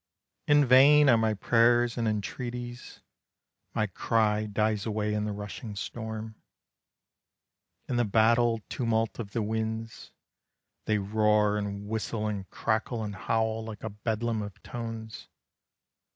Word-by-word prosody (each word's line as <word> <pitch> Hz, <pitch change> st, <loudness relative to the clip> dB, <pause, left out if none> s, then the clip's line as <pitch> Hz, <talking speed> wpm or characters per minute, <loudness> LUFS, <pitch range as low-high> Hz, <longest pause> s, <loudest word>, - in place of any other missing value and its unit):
In 145 Hz, -1 st, +5 dB
vain 140 Hz, +3 st, +7 dB
are 120 Hz, -, +6 dB
my 110 Hz, -1 st, +1 dB
prayers 120 Hz, +3 st, +3 dB
and 115 Hz, -2 st, -1 dB
entreaties, 120 Hz, +4 st, -5 dB, 0.7 s
My 110 Hz, -, +2 dB
cry 105 Hz, +2 st, +1 dB
dies 105 Hz, +1 st, 0 dB
away 105 Hz, -1 st, -1 dB
in 105 Hz, 0 st, -1 dB
the 105 Hz, -, -2 dB
rushing 105 Hz, +1 st, -7 dB
storm, 110 Hz, +1 st, -5 dB, 1.5 s
In 125 Hz, -, -1 dB
the 120 Hz, -, +3 dB
battle 115 Hz, +2 st, +3 dB
tumult 115 Hz, -2 st, -1 dB
of 105 Hz, -3 st, -6 dB
the 115 Hz, -, 0 dB
winds. 110 Hz, +1 st, -4 dB, 0.8 s
They 110 Hz, -, +2 dB
roar 105 Hz, +1 st, +2 dB
and 100 Hz, -1 st, -4 dB
whistle 110 Hz, 0 st, -2 dB
and 100 Hz, -3 st, -4 dB
crackle 110 Hz, +1 st, -1 dB
and 105 Hz, -1 st, -4 dB
howl 110 Hz, +3 st, -1 dB
Like 110 Hz, -2 st, -8 dB
a 110 Hz, -, -4 dB
bedlam 110 Hz, +2 st, -2 dB
of 100 Hz, -2 st, -9 dB
tones. 115 Hz, -2 st, -7 dB
110 Hz, 130 wpm, -28 LUFS, 105-115 Hz, 1.5 s, vain